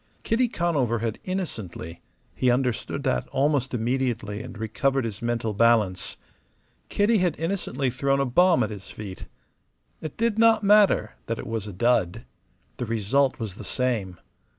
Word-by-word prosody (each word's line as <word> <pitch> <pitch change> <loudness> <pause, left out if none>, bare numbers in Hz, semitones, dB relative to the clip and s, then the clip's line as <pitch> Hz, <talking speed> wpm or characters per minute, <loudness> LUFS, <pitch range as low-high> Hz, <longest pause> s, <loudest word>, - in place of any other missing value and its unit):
Kitty 245 +2 +2
Conover 150 - 0
had 115 -1 -3
innocently 105 - -5 0.3
he 130 - +1
understood 125 -2 0
that 60 - 0
almost 135 -1 +1
immediately 120 -3 -1
and - - -9
recovered 130 +4 0
his 110 -3 -5
mental 115 -2 -1
balance 105 -4 +2 0.7
Kitty 210 +2 +3
had 175 -4 +1
innocently 160 -7 -1
thrown 135 +2 +1
a 140 - +2
bomb 175 +8 +4
at - - -3
his 100 -2 -8
feet. 100 -3 -8 0.8
It 155 - -6
did 225 -1 +1
not 225 -2 +5
matter 205 0 +4
that 115 - -2
it - - -6
was 115 -2 -3
a - - -5
dud. 115 0 +1 0.5
The 125 - -3
result 115 +5 +1
was 105 -5 -5
the - - -8
same. 110 -9 -2
125 Hz, 150 wpm, -25 LUFS, 110-155 Hz, 0.8 s, not